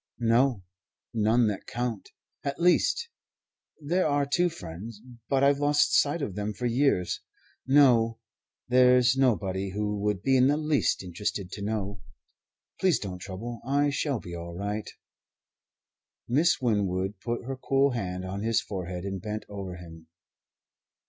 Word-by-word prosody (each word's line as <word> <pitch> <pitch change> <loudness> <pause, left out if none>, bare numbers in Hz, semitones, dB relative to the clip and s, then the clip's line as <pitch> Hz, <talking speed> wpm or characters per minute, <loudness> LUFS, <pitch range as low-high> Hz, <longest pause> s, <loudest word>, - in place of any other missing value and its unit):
"No. 120 -2 +2 0.5
None 115 +2 +3
that 100 - -5
count. 120 -2 -3 0.3
At 140 0 -3
least 180 - +3 0.7
there 170 +5 +1
are 145 -1 +1
two 175 +5 +2
friends, 100 - -9 0.3
but 135 -1 +2
I've 140 0 +4
lost 145 0 +3
sight 145 +2 +3
of 105 - -3
them 105 +2 -3
for 125 - -4
years. 120 -7 +1 0.5
No 125 -5 +5 0.5
there's 125 0 +5
nobody 100 -7 +1
who 105 +1 -2
would 105 -2 -1
be 135 - +3
in 130 +1 +5
the 145 +2 +3
least 150 -8 +1
interested 90 +1 -4
to 100 - -7
know. 100 -2 -3 0.8
Please 185 -5 +3
don't 90 -3 -6
trouble. 105 +6 -7
I 145 +3 +1
shall 140 -3 -1
be 85 - -9
all 85 0 -7
right." 100 +3 -3 1.4
Miss 150 +9 +3
Winwood 100 -4 0
put 120 +2 -4
her 135 +1 -3
cool 135 +1 +2
hand 90 -6 -3
on 100 +2 -4
his 115 +1 +2
forehead 90 -2 -5
and 95 -2 -4
bent 105 +2 -5
over 100 -3 -6
him. 80 -2 -12
115 Hz, 145 wpm, -27 LUFS, 95-135 Hz, 1.4 s, No